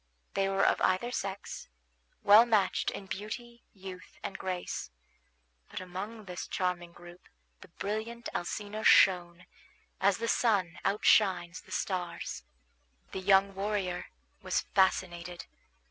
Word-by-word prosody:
They 195 0 +1
were 195 0 +2
of - - +2
either 190 +7 +2
sex, 195 -4 -5 0.6
well 210 +3 +9
matched 215 -5 +2
in 195 - -7
beauty, 225 +5 -7
youth, 190 -1 -10
and - - -4
grace; 180 - -4 0.8
but - - -5
among 195 +4 -7
this 180 -2 -6
charming 180 -2 -2
group 175 +1 -14 0.3
the - - -13
brilliant 220 +4 -4
Alcina 210 +4 -4
shone, 175 -3 +5 0.5
as 195 0 +3
the 230 - -3
sun 200 -9 +1
outshines 190 -3 +3
the - - -18
stars. 175 - -3 0.7
The - - -4
young 195 +1 +4
warrior 195 -2 -2 0.3
was - - 0
fascinated. 180 -2 +1
195 Hz, 120 wpm, -31 LUFS, 180-210 Hz, 0.8 s, well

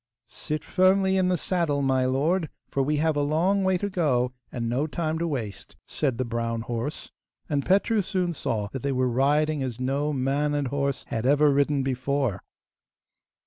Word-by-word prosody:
'Sit 150 0 -5
firmly 190 +1 +3
in 185 -1 +2
the 180 -1 +2
saddle, 165 -6 0
my 130 -1 +2
lord, 155 +6 +1 0.2
for 140 - +1
we 150 +3 +1
have 160 +1 +1
a 145 - +1
long 170 +7 +2
way 190 -1 +2
to 205 - -2
go 135 -10 +1 0.2
and 115 -2 -3
no 130 +6 0
time 160 0 -2
to 170 - 0
waste,' 110 -10 -5
said 135 -6 -1
the 130 - -1
brown 115 -1 -2
horse, 120 +6 -4 0.4
and 145 -3 -1
Petru 200 +3 +3
soon 180 -2 -1
saw 110 -8 -2
that 135 +2 -6
they 140 - -1
were 130 -1 +1
riding 145 +4 +2
as 125 -3 -4
no 140 +4 0
man 140 +2 0
and 140 -3 -1
horse 140 0 -1
had 115 +2 -1
ever 145 +1 +5
ridden 140 0 +2
before. 130 -3 -1
145 Hz, 185 wpm, -26 LUFS, 130-160 Hz, 0.4 s, ever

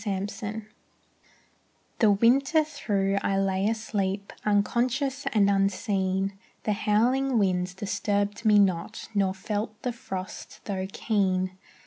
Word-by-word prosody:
THE 200 -1 -2
BUD 215 0 -4 1.3
The 215 -2 +5
winter 270 +9 +4
through 200 -10 -1
I 195 - 0
lay 195 0 +1
asleep, 200 -3 -2
Unconscious 250 +7 +1
and 205 -3 +4
unseen; 195 -1 +1 0.3
The 215 - +1
howling 245 +6 +2
winds 180 -3 +1
disturbed 205 +1 -1
me 215 -2 +5
not, 195 +1 +1
Nor 195 -2 +1
felt 210 +2 -4
the 250 - -1
frost 195 -6 -7
tho' 190 -2 -2
keen. 185 -4 0
205 Hz, 115 wpm, -27 LUFS, 195-225 Hz, 1.3 s, The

